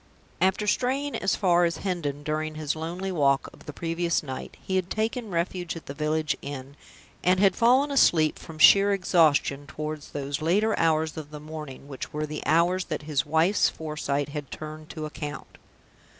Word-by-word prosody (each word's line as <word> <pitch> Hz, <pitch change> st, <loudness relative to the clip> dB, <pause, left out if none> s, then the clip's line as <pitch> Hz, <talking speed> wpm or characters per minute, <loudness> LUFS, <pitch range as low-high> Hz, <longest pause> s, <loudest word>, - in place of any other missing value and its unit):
After 190 Hz, +3 st, +2 dB
straying 265 Hz, +6 st, 0 dB
as 195 Hz, -, +1 dB
far 175 Hz, -3 st, +3 dB
as 170 Hz, -1 st, +1 dB
Hendon 150 Hz, -7 st, -3 dB
during 155 Hz, +1 st, -2 dB
his 155 Hz, -1 st, -2 dB
lonely 175 Hz, +4 st, -4 dB
walk 140 Hz, -5 st, +2 dB
of -, -, -17 dB
the -, -, -4 dB
previous 165 Hz, +2 st, -1 dB
night, 130 Hz, -3 st, -7 dB
he 190 Hz, -, -3 dB
had 185 Hz, -1 st, 0 dB
taken 220 Hz, +2 st, -2 dB
refuge 175 Hz, 0 st, -2 dB
at 165 Hz, -, -9 dB
the 140 Hz, -, -6 dB
village 155 Hz, 0 st, 0 dB
inn, 140 Hz, -1 st, -7 dB, 0.5 s
and 185 Hz, +1 st, +3 dB
had 195 Hz, -1 st, +4 dB
fallen 255 Hz, +5 st, +4 dB
asleep 160 Hz, -, +4 dB
(from 160 Hz, -2 st, -10 dB
sheer 200 Hz, +5 st, +7 dB
exhaustion) 155 Hz, -6 st, +2 dB
toward 150 Hz, +1 st, -5 dB
those 140 Hz, 0 st, -3 dB
later 205 Hz, +7 st, +2 dB
hours 160 Hz, -1 st, +1 dB
of 155 Hz, -2 st, -6 dB
the 150 Hz, 0 st, -8 dB
morning 150 Hz, -3 st, -8 dB
which 135 Hz, -2 st, -7 dB
were 150 Hz, 0 st, -2 dB
the 150 Hz, 0 st, -5 dB
hours 175 Hz, +4 st, +3 dB
that -, -, -4 dB
his 150 Hz, -2 st, -1 dB
wife's 160 Hz, +6 st, +3 dB
foresight 150 Hz, -2 st, -3 dB
had 145 Hz, -2 st, -6 dB
turned 155 Hz, +1 st, -8 dB
to 155 Hz, -1 st, -5 dB
account. 150 Hz, -1 st, -7 dB
160 Hz, 180 wpm, -26 LUFS, 150-185 Hz, 0.5 s, sheer